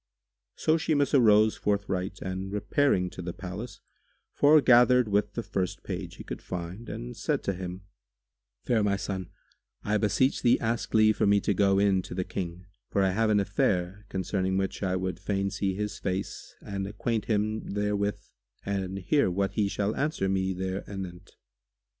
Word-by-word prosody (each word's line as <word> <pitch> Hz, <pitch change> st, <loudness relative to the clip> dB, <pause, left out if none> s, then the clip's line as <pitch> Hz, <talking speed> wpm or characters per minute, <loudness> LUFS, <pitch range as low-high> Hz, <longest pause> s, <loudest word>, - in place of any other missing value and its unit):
"[FN#144] -, -, -14 dB
So 155 Hz, +1 st, +4 dB
Shimas 150 Hz, -3 st, +1 dB
arose 110 Hz, -4 st, +5 dB
forthright 95 Hz, -2 st, -1 dB
and 95 Hz, +1 st, -4 dB
repairing 105 Hz, -2 st, +1 dB
to -, -, -8 dB
the 90 Hz, 0 st, -5 dB
palace, 95 Hz, +6 st, -7 dB, 0.5 s
foregathered 125 Hz, -4 st, +6 dB
with 105 Hz, 0 st, +1 dB
the 115 Hz, -, -2 dB
first 95 Hz, -2 st, -3 dB
page 90 Hz, -2 st, -5 dB
he -, -, -9 dB
could -, -, -7 dB
find 90 Hz, +5 st, -6 dB
and -, -, -6 dB
said -, -, -1 dB
to 100 Hz, -, 0 dB
him, 90 Hz, 0 st, -6 dB, 0.8 s
"Fair 115 Hz, -3 st, +2 dB
my 100 Hz, -1 st, +2 dB
son, 95 Hz, -2 st, -4 dB, 0.5 s
I 105 Hz, +1 st, +1 dB
beseech 120 Hz, +6 st, +2 dB
thee 120 Hz, -, +4 dB
ask 115 Hz, 0 st, -2 dB
leave 110 Hz, -1 st, +5 dB
for -, -, +2 dB
me 100 Hz, 0 st, +5 dB
to 105 Hz, -, +1 dB
go 95 Hz, 0 st, +3 dB
in 100 Hz, -1 st, +3 dB
to 90 Hz, -, -8 dB
the 90 Hz, -, -1 dB
King, 90 Hz, -1 st, -5 dB, 0.2 s
for 100 Hz, -, +2 dB
I 95 Hz, -, +3 dB
have 110 Hz, +3 st, +1 dB
an 105 Hz, -1 st, +4 dB
affair, 100 Hz, 0 st, 0 dB
concerning 95 Hz, 0 st, -1 dB
which 95 Hz, 0 st, -2 dB
I 95 Hz, -2 st, 0 dB
would 95 Hz, 0 st, -3 dB
fain 100 Hz, 0 st, -1 dB
see 95 Hz, -1 st, -1 dB
his 105 Hz, +1 st, -3 dB
face 95 Hz, 0 st, -4 dB
and 95 Hz, -1 st, -4 dB
acquaint 110 Hz, +2 st, -2 dB
him 110 Hz, 0 st, -1 dB
therewith 105 Hz, 0 st, -1 dB, 0.4 s
and 95 Hz, -1 st, -2 dB
hear 100 Hz, +5 st, +2 dB
what 95 Hz, +2 st, 0 dB
he 105 Hz, -2 st, +1 dB
shall 100 Hz, +2 st, -1 dB
answer 150 Hz, -9 st, 0 dB
me 95 Hz, 0 st, 0 dB
there 95 Hz, +1 st, -3 dB
anent." 95 Hz, -3 st, -8 dB
100 Hz, 175 wpm, -28 LUFS, 95-105 Hz, 0.8 s, foregathered